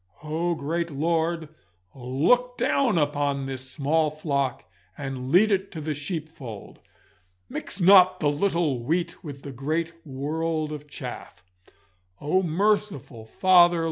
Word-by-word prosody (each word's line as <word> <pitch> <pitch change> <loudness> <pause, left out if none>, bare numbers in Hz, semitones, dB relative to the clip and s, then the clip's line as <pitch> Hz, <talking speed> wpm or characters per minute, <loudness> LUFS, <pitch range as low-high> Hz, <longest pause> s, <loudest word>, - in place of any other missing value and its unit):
Oh, 165 +3 -1
great 165 +3 -2
Lord, 165 +2 -1 0.4
look 155 - +1
down 250 -9 +2
upon 145 -2 0
this 130 -1 -5
small 155 +3 +1
flock 140 -4 -2 0.3
and 135 -2 -5
lead 205 +8 +5
it 195 0 0
to 160 - -5
the 155 0 -2
sheep 155 +2 -4
fold! 120 -10 -10 0.7
Mix 180 - -6
not 185 0 +7
the 145 -2 +2
little 160 -5 0
wheat 170 +7 -2
with 140 -4 -8
the 140 - -7
great 155 +6 -2
world 155 +3 -2
of 150 -1 -7
chaff. 140 - -8 0.8
Oh, 155 +6 +1
merciful 180 - -1
Father! 175 +3 +5
155 Hz, 130 wpm, -25 LUFS, 140-175 Hz, 0.8 s, not